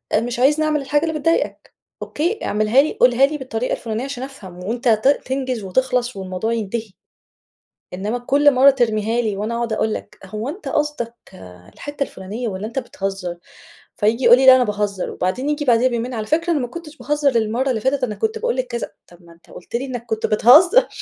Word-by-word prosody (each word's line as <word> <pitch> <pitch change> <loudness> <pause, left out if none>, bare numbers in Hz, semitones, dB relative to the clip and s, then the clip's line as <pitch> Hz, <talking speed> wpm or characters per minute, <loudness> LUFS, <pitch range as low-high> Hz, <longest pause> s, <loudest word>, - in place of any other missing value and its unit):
مش 235 +2 -1
عايزني 295 +4 +3
أعمل 305 -2 0
الحاجة 290 +3 0
اللي 315 -1 -2
بتضايقك، 330 +3 -1 0.3
أوكي، 350 +9 -2
اعملها 215 +5 +3
لي 305 - -2
قولها 250 +2 +4
لي 300 +2 -3
بالطريقة 250 -2 -3
الفلانية 225 +1 -4
عشان 270 -2 -5
أفهم، 190 -10 -10
وأنت 240 +5 -3
ت 220 +4 +2
تنجز 260 -5 0
وتِخلَص 250 +4 0
والموضوع 190 +4 -3
ينتهي. 220 -1 -4 1.0
إنّما 210 +6 -3
كلّ 280 +3 +3
مرّه 265 +2 +7
ترميها 230 -3 +1
لي 210 -4 -2
وأنا 220 +3 -3
أقعد 235 -1 -2
أقول 220 0 0
لك - - -8
هو 215 +7 -5
أنتَ 375 +7 -8
قصدك 295 -6 -2 0.2
آآ، 90 -1 -14
الحتّة 290 -1 -4
الفلانية 215 +3 -6
والَّا 200 +1 -4
أنت 250 +4 -3
بتهزّر؟ 195 -6 -5 0.6
فييجي 230 +4 0
يقول 240 +1 +8
لي 265 - +2
لأ 260 -1 +10
أنا 255 - +3
باهزر، 205 -3 -2
وبعدين 250 +11 -2
ييجي 295 0 -1
بعديها 245 +1 +4
بيومين، 240 +1 -3
على 215 -2 -3
فكرة 335 +3 +1
أنا 295 - 0
ما 245 - -2
كنتش 315 +2 -10
باهزر 290 -3 0
المرّه 230 +4 0
اللي 225 -4 -1
فاتت، 265 +1 0
أنا 215 -4 -1
كنت 445 0 -2
باقول 480 +1 -1
لك - - -1
كذا 480 0 -5 0.2
طَب 175 0 -19
ما 170 0 -16
أنت 165 - -25
قلت 180 - -9
لي 260 +3 -1
إنك 245 -3 -6
كنت 220 -1 -2
بتهزّر. 335 - +6
245 Hz, 205 wpm, -20 LUFS, 215-280 Hz, 1.0 s, لأ